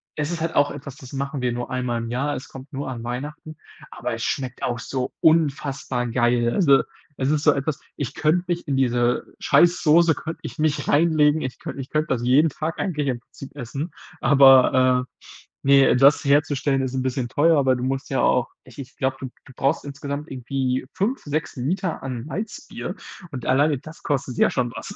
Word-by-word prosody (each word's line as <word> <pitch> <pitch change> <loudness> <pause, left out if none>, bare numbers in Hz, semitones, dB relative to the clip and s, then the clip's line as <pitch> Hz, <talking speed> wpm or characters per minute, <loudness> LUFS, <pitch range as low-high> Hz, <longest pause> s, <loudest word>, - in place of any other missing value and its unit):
es 150 +1 -2
ist 170 -2 -4
halt 165 - -2
auch 145 0 +3
etwas, 140 -1 -9
das 130 -4 -12
machen 140 0 -3
wir 125 -1 0
nur 120 0 -4
einmal 125 -2 -1
im 115 - -5
Jahr. 140 +4 -1
Es 130 - -8
kommt 135 +3 -12
nur 135 0 -4
an 120 -2 -6
Weihnachten, 150 +5 -6 0.3
aber 120 0 -4
es 115 - -8
schmeckt 130 -2 -3
auch 120 - -1
so 125 +2 -4
unfassbar 140 -5 +1
geil, 120 0 +2
also, 140 -8 +5 0.4
es 130 - +1
ist 150 -1 0
so 150 - +6
etwas, 140 +1 -3 0.2
ich 140 -5 -4
könnte 160 +3 +1
mich 175 -1 -2
in 140 -2 0
diese 120 -2 +1
scheiß 175 +1 +4
Soße 160 +1 +5
könnte 160 +2 -6
ich - - -8
mich 155 -1 0
reinlegen 155 -1 +3
ich 130 -1 -5
könnte 135 - -6
ich 130 - -9
könnte 155 +1 0
das 125 -5 -1
jeden 135 +6 +4
Tag 155 +4 -4
eigentlich 150 -6 -1
im 125 -3 -1
Prinzip 135 +3 -13
essen, 140 +6 -5 0.3
aber, 130 -1 +6 0.6
äh, - - -2
ne, 140 -2 +6
das 140 +3 +5
herzustellen 140 -1 +2
ist 130 -1 -3
'n 130 - 0
bisschen 130 -1 -2
teuer, 160 +5 +3
aber 130 -2 +3
du 125 - -4
musst 135 +1 -3
ja 135 -2 +1
auch 125 0 +2 0.2
ich 130 -1 -17
ich 135 -1 -9
glaube, 130 0 0
du 135 - -4 0.2
du - - -13
brauchst 140 +4 0
insgesamt 140 +2 -6
irgendwie 130 0 -2
5, 235 +8 -1
6 150 0 -3
Liter 175 +7 -2
an 130 -2 -5
Malzbier 205 +7 -6 0.3
und 125 -5 -7
alleine 145 +2 +3
das 155 +5 -13
kostet 135 -4 -2
ja - - +4
schon 125 -2 -1
was. - - -7
135 Hz, 205 wpm, -23 LUFS, 125-150 Hz, 0.6 s, so